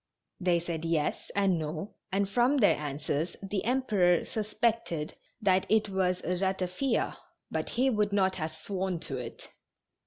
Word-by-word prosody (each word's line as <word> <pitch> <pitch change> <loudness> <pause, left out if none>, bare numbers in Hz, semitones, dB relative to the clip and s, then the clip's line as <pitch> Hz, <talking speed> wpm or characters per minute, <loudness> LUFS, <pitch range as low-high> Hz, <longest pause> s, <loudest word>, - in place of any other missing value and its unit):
They 175 -2 +3
said 165 -1 -4
yes 165 -3 0
and 195 -4 +3
no, 155 +6 -4 0.2
and 195 +1 +1
from 245 +7 +3
their 215 -6 +5
answers 150 +2 -2
the 195 0 -2
Emperor 215 -9 +3
suspected 215 -7 -1 0.3
that 190 -4 +3
it 215 -1 +3
was 185 -2 0
ratafia, 190 +6 0 0.3
but - - -2
he 260 +2 +2
would 210 -2 +1
not 190 -2 +2
have 155 -2 -3
sworn 190 0 -2
to 135 - -4
it. 120 -2 -8
190 Hz, 145 wpm, -30 LUFS, 170-210 Hz, 0.3 s, their